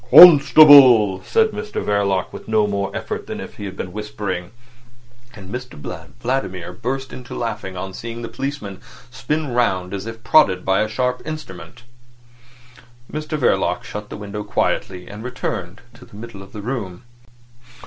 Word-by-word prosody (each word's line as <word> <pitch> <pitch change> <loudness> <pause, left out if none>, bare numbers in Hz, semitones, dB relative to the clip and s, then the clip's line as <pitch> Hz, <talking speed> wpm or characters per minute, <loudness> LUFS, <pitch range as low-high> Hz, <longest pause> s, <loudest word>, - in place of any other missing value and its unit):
"Constable!" 140 - +9
said 220 - +2
Mr 210 0 -7
Verloc, 100 -2 -1
with - - -10
no 110 -1 +2
more 100 -1 -2
effort - - -5
than - - -6
if - - -9
he 100 -1 -5
were 95 - -6
whispering; 95 -2 -5 0.9
and 95 -2 -10
Mr 125 0 -6 0.4
Vladimir 95 -9 -3
burst 130 +7 -4
into 125 -1 -9
a - - -5
laugh 115 -1 -3
on 95 0 -6
seeing 115 +3 -7
the - - -4
policeman 115 -5 -6 0.3
spin 150 +3 -3
round 95 -6 0
as 100 +2 -5
if 115 0 -9
prodded 95 -13 +4
by 95 +1 +2
a 110 - 0
sharp 125 +2 -1
instrument. 155 -5 -9 1.3
Mr 155 0 -3
Verloc 95 -9 +1
shut 105 0 -8
the - - -7
window 105 0 -6
quietly, 90 -2 -2
and 105 +2 -9
returned 105 -7 -5
to - - -16
the - - -16
middle 110 -2 -9
of 95 - -13
the 105 - -8
room. 110 -5 -5
110 Hz, 160 wpm, -20 LUFS, 95-125 Hz, 1.3 s, Constable